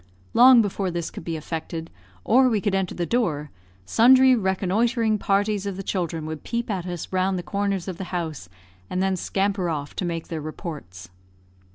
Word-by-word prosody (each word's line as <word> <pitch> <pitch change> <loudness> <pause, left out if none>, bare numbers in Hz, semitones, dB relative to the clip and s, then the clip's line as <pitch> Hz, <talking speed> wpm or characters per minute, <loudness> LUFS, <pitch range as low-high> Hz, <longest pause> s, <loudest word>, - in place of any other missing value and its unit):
Long 245 -1 +8
before 195 -1 -2
this 170 -1 -3
could - - -8
be 165 0 -3
effected, 160 +1 -5 0.3
or 255 +1 +5
we 220 -3 +1
could 205 -1 -1
enter 190 -2 -1
the 175 - -1
door, 160 - -1 0.3
sundry 255 - +6
reconnoitring 215 +3 +1
parties 200 0 0
of 195 -2 -4
the 195 - -5
children 170 -5 -2
would 155 -1 -6
peep 235 -1 -3
at 185 -3 -3
us 175 0 -6
round 185 0 +1
the 175 - -4
corners 200 -2 -2
of 185 -3 -5
the 190 - -4
house, 160 - -4 0.4
and 185 - -1
then 190 0 +1
scamper 195 0 -1
off 145 -3 -4
to - - -1
make 170 -2 -3
their 160 -2 -4
reports. 145 - -8
185 Hz, 185 wpm, -24 LUFS, 165-205 Hz, 0.4 s, Long